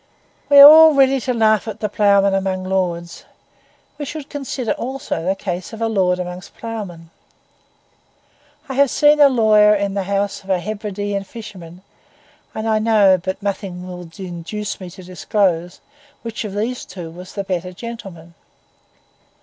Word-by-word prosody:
We 285 Hz, -, +6 dB
are 280 Hz, -, +13 dB
all 315 Hz, 0 st, +8 dB
ready 270 Hz, 0 st, +4 dB
to 255 Hz, +1 st, -2 dB
laugh 220 Hz, -3 st, +2 dB
at 220 Hz, -1 st, -6 dB
the 210 Hz, -, -1 dB
ploughman 200 Hz, -1 st, +3 dB
among 190 Hz, -1 st, -1 dB
lords; 180 Hz, -3 st, -3 dB, 0.8 s
we 290 Hz, -, -4 dB
should 295 Hz, 0 st, -8 dB
consider 265 Hz, -4 st, -4 dB
also 265 Hz, -, -4 dB
the 190 Hz, +1 st, 0 dB
case 185 Hz, +1 st, -5 dB
of 220 Hz, -, -8 dB
a 230 Hz, -, 0 dB
lord 185 Hz, -5 st, +1 dB
among 180 Hz, 0 st, -5 dB
the 185 Hz, -, -14 dB
ploughmen. 195 Hz, -8 st, -7 dB, 1.6 s
I 270 Hz, -, -5 dB
have 280 Hz, +1 st, +3 dB
seen 295 Hz, +3 st, +4 dB
a 285 Hz, -1 st, +7 dB
lawyer 215 Hz, -4 st, +4 dB
in 200 Hz, -1 st, -2 dB
the 195 Hz, -1 st, -2 dB
house 200 Hz, 0 st, -2 dB
of 190 Hz, -, -16 dB
a 190 Hz, -, +2 dB
Hebridean 205 Hz, 0 st, -4 dB
fisherman; 185 Hz, -6 st, -11 dB, 0.7 s
and 220 Hz, +1 st, -3 dB
I 220 Hz, -1 st, +2 dB
know, 210 Hz, -4 st, +4 dB
but 190 Hz, +1 st, -4 dB
nothing 190 Hz, -3 st, -4 dB
will 180 Hz, -2 st, -9 dB
induce 190 Hz, +3 st, -6 dB
me 185 Hz, -, -7 dB
to 185 Hz, +2 st, -13 dB
disclose, 180 Hz, -1 st, -1 dB, 0.4 s
which 230 Hz, -1 st, -5 dB
of 200 Hz, -2 st, -6 dB
these 235 Hz, +4 st, -3 dB
two 170 Hz, -4 st, -9 dB
was 180 Hz, +2 st, -11 dB
the 200 Hz, -, -3 dB
better 180 Hz, -1 st, -4 dB
gentleman. 185 Hz, -5 st, -10 dB
200 Hz, 165 wpm, -19 LUFS, 185-225 Hz, 1.6 s, are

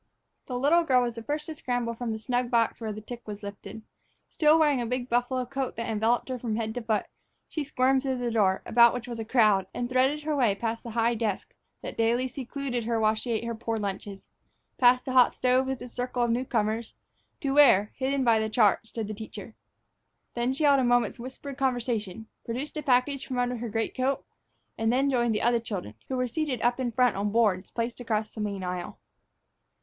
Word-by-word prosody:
The 250 Hz, -, -3 dB
little 305 Hz, +7 st, +4 dB
girl 255 Hz, -5 st, +3 dB
was 240 Hz, -1 st, -2 dB
the 230 Hz, -, -7 dB
first 295 Hz, +5 st, -3 dB
to 320 Hz, -, -5 dB
scramble 245 Hz, -5 st, -2 dB
from 235 Hz, 0 st, -4 dB
the 220 Hz, -, -2 dB
snug 245 Hz, +2 st, -1 dB
box 235 Hz, -1 st, +1 dB
when 215 Hz, -2 st, -3 dB
the 215 Hz, -, -7 dB
tick 240 Hz, +2 st, -8 dB
was 210 Hz, 0 st, -7 dB
lifted. 205 Hz, +2 st, -8 dB, 0.5 s
Still 310 Hz, 0 st, +4 dB
wearing 295 Hz, -5 st, +3 dB
a -, -, -2 dB
big 250 Hz, +1 st, -2 dB
buffalo 245 Hz, +1 st, 0 dB
coat 265 Hz, +1 st, -3 dB
that 230 Hz, +1 st, -4 dB
enveloped 225 Hz, +2 st, +1 dB
her 255 Hz, -1 st, -3 dB
from 230 Hz, -2 st, -2 dB
head 220 Hz, -1 st, -2 dB
to 245 Hz, -, -4 dB
foot, 220 Hz, -2 st, 0 dB, 0.4 s
she 310 Hz, -, -3 dB
squirmed 265 Hz, -1 st, +2 dB
through 265 Hz, -1 st, -1 dB
the 245 Hz, -1 st, -2 dB
door, 195 Hz, -4 st, +2 dB
about 235 Hz, +1 st, +5 dB
which 245 Hz, 0 st, -5 dB
was 235 Hz, -2 st, -6 dB
a -, -, -2 dB
crowd, 215 Hz, -5 st, +3 dB
and 240 Hz, -, -2 dB
threaded 265 Hz, +4 st, +1 dB
her 305 Hz, 0 st, -1 dB
way 240 Hz, -8 st, +3 dB
past 230 Hz, +2 st, -3 dB
the 235 Hz, -, -8 dB
high 230 Hz, +1 st, +1 dB
desk 215 Hz, -4 st, -3 dB, 0.3 s
that -, -, -6 dB
daily 235 Hz, +3 st, +2 dB
secluded 255 Hz, -2 st, -4 dB
her 230 Hz, -1 st, 0 dB
while 215 Hz, 0 st, +3 dB
she 220 Hz, +3 st, -6 dB
ate 230 Hz, -1 st, 0 dB
her 235 Hz, 0 st, -3 dB
poor 225 Hz, 0 st, -3 dB
lunches, 200 Hz, -1 st, -5 dB, 0.5 s
past 250 Hz, 0 st, +5 dB
the 260 Hz, -, -3 dB
hot 255 Hz, -1 st, +5 dB
stove 255 Hz, +1 st, +2 dB
with 265 Hz, -1 st, -2 dB
its 245 Hz, -, -10 dB
circle 245 Hz, 0 st, -1 dB
of 240 Hz, -, +1 dB
new 245 Hz, +3 st, 0 dB
comers, 220 Hz, -1 st, -1 dB, 0.4 s
to 275 Hz, -, -1 dB
where, 240 Hz, -8 st, +6 dB
hidden 270 Hz, +1 st, 0 dB
by 230 Hz, -3 st, +4 dB
the 220 Hz, 0 st, -1 dB
chart, 215 Hz, -1 st, +3 dB
stood 225 Hz, -2 st, -5 dB
the 215 Hz, -, -4 dB
teacher. 220 Hz, 0 st, -9 dB, 0.8 s
There 240 Hz, +1 st, 0 dB
she 270 Hz, +4 st, -2 dB
held 285 Hz, -2 st, +5 dB
a -, -, +2 dB
moment's 245 Hz, 0 st, +2 dB
whispered 260 Hz, +3 st, -8 dB
conversation, 235 Hz, -6 st, -1 dB, 0.2 s
produced 260 Hz, +7 st, -5 dB
a 305 Hz, -, -2 dB
package 270 Hz, 0 st, +1 dB
from 255 Hz, -, -3 dB
under 245 Hz, 0 st, 0 dB
her 235 Hz, 0 st, -4 dB
greatcoat, 255 Hz, +5 st, -1 dB, 0.5 s
and 225 Hz, 0 st, +2 dB
then 270 Hz, +3 st, +2 dB
joined 240 Hz, -3 st, +1 dB
the -, -, -1 dB
other 240 Hz, 0 st, +3 dB
children, 200 Hz, -, -5 dB
who 260 Hz, -, -2 dB
were 255 Hz, -, +1 dB
seated 260 Hz, 0 st, -2 dB
up 240 Hz, +1 st, +2 dB
in 250 Hz, -2 st, -1 dB
front 250 Hz, 0 st, +3 dB
on 205 Hz, +1 st, -1 dB
boards 210 Hz, -4 st, +2 dB
placed 235 Hz, +1 st, -3 dB
across 220 Hz, -3 st, -2 dB
the 220 Hz, -, -6 dB
main 200 Hz, -2 st, -3 dB
aisle. 180 Hz, -1 st, -4 dB
240 Hz, 220 wpm, -27 LUFS, 220-255 Hz, 0.8 s, where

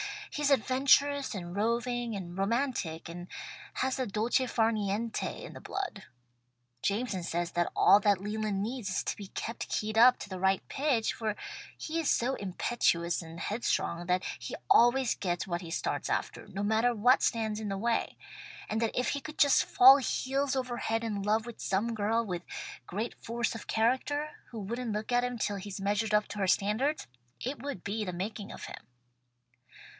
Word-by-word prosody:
He 295 Hz, -, -4 dB
is 290 Hz, -, +3 dB
adventurous 275 Hz, +1 st, +3 dB
and 175 Hz, -1 st, -6 dB
roving 235 Hz, +2 st, 0 dB
and 175 Hz, -3 st, -6 dB
romantic, 195 Hz, -, -1 dB
and 175 Hz, +1 st, -8 dB, 0.5 s
has 260 Hz, 0 st, 0 dB
the 260 Hz, -2 st, -1 dB
dolce 235 Hz, +6 st, +1 dB
far 225 Hz, -1 st, +2 dB
niente 215 Hz, +1 st, -2 dB
in -, -, -8 dB
the -, -, -9 dB
blood. 385 Hz, -, -5 dB, 0.8 s
Jameson 200 Hz, -2 st, -1 dB
says 170 Hz, 0 st, -2 dB
that 175 Hz, 0 st, 0 dB
all 200 Hz, -, +7 dB
that 205 Hz, -2 st, +3 dB
Leland 210 Hz, -1 st, -2 dB
needs 235 Hz, -2 st, -3 dB
is 190 Hz, -, -1 dB
to -, -, -3 dB
be 200 Hz, -, -8 dB
kept 230 Hz, +4 st, -5 dB
keyed 215 Hz, +1 st, -2 dB
up 250 Hz, +2 st, +8 dB
to -, -, -7 dB
the 185 Hz, -1 st, -5 dB
right 190 Hz, 0 st, +1 dB
pitch, 265 Hz, -6 st, +1 dB
for 215 Hz, -2 st, -2 dB, 0.4 s
he 325 Hz, +1 st, -3 dB
is 320 Hz, -, 0 dB
so 245 Hz, +3 st, +2 dB
impetuous 175 Hz, -3 st, 0 dB
and 165 Hz, 0 st, -9 dB
headstrong 175 Hz, -5 st, -1 dB
that 180 Hz, +1 st, +2 dB, 0.2 s
he -, -, -5 dB, 0.2 s
always 240 Hz, +1 st, +5 dB
gets 175 Hz, -2 st, -2 dB
what 175 Hz, -1 st, -2 dB
he 170 Hz, -, -8 dB
starts 165 Hz, -, -2 dB
after, -, -, -2 dB
no 195 Hz, +2 st, -4 dB
matter 220 Hz, +3 st, +2 dB
what 245 Hz, +5 st, +5 dB
stands 220 Hz, -2 st, 0 dB
in 215 Hz, -, -4 dB
the 195 Hz, -1 st, -2 dB
way; 230 Hz, +3 st, 0 dB, 0.5 s
and 220 Hz, +1 st, -1 dB
that 230 Hz, -, -1 dB
if 250 Hz, -1 st, +1 dB
he 285 Hz, -, -1 dB
could 305 Hz, +2 st, -9 dB
just 285 Hz, -1 st, +5 dB
fall 265 Hz, +2 st, +8 dB
heels 270 Hz, +1 st, 0 dB
over 250 Hz, -2 st, -2 dB
head 225 Hz, 0 st, -1 dB
in 210 Hz, -3 st, -2 dB
love 215 Hz, +2 st, +1 dB
with 240 Hz, -2 st, -9 dB
some 215 Hz, +5 st, 0 dB
girl 225 Hz, +2 st, +1 dB
with 180 Hz, -4 st, -3 dB, 0.5 s
great 215 Hz, +6 st, -3 dB
force 235 Hz, 0 st, -1 dB
of 225 Hz, -, -8 dB
character, 260 Hz, +6 st, +1 dB, 0.2 s
who 230 Hz, -, -7 dB
wouldn't 235 Hz, +3 st, -3 dB
look 215 Hz, +3 st, -3 dB
at 245 Hz, 0 st, +3 dB
him 245 Hz, -1 st, -3 dB
till 205 Hz, -2 st, -1 dB
he'd 195 Hz, 0 st, -6 dB
measured 205 Hz, +2 st, 0 dB
up 210 Hz, 0 st, +3 dB
to 205 Hz, -, -6 dB
her 195 Hz, -, +1 dB
standards, 220 Hz, +11 st, +1 dB, 0.4 s
it 260 Hz, 0 st, -4 dB
would 280 Hz, -10 st, -5 dB
be 215 Hz, +2 st, -2 dB
the 180 Hz, -3 st, -4 dB
making 200 Hz, +3 st, -5 dB
of -, -, -9 dB
him." -, -, -10 dB
220 Hz, 190 wpm, -30 LUFS, 195-245 Hz, 0.8 s, up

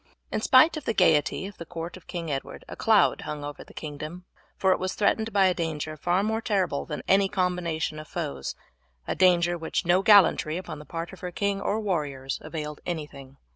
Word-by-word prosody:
In -, -, -1 dB
spite 270 Hz, +8 st, +6 dB
of 300 Hz, -, -7 dB
the 225 Hz, -, -1 dB
gaiety 160 Hz, -1 st, +3 dB
of 200 Hz, 0 st, -9 dB
the -, -, -5 dB
court 170 Hz, 0 st, -6 dB
of 185 Hz, -, -15 dB
King 170 Hz, -3 st, -4 dB
Edward 135 Hz, -1 st, -5 dB
a -, -, -8 dB
cloud -, -, +3 dB
hung 150 Hz, -1 st, -5 dB
over 145 Hz, 0 st, -7 dB
the -, -, -17 dB
kingdom; 155 Hz, +4 st, -7 dB, 0.3 s
for 190 Hz, -, +3 dB
it -, -, +2 dB
was 185 Hz, 0 st, -2 dB
threatened 220 Hz, +2 st, +1 dB
by 195 Hz, -1 st, +4 dB
a 185 Hz, -, +4 dB
danger 155 Hz, -3 st, -3 dB
far 175 Hz, +5 st, +1 dB
more 220 Hz, +1 st, 0 dB
terrible 190 Hz, -10 st, 0 dB
than 150 Hz, -, -5 dB
any 195 Hz, 0 st, +4 dB
combination 180 Hz, -5 st, -1 dB
of 155 Hz, -, -9 dB
foes 150 Hz, -, -4 dB, 0.5 s
a -, -, 0 dB
danger 175 Hz, -2 st, +3 dB
which 160 Hz, -, -2 dB
no 175 Hz, +2 st, +4 dB
gallantry 195 Hz, -6 st, +5 dB
upon 170 Hz, -5 st, -7 dB
the 150 Hz, -, -11 dB
part 170 Hz, +3 st, -6 dB
of 190 Hz, -, -11 dB
her 180 Hz, -, -5 dB
king 200 Hz, +2 st, -1 dB
or 210 Hz, -, 0 dB
warriors 145 Hz, -10 st, -2 dB
availed 150 Hz, -2 st, -6 dB
anything. 145 Hz, -5 st, -6 dB
175 Hz, 210 wpm, -26 LUFS, 155-195 Hz, 0.5 s, spite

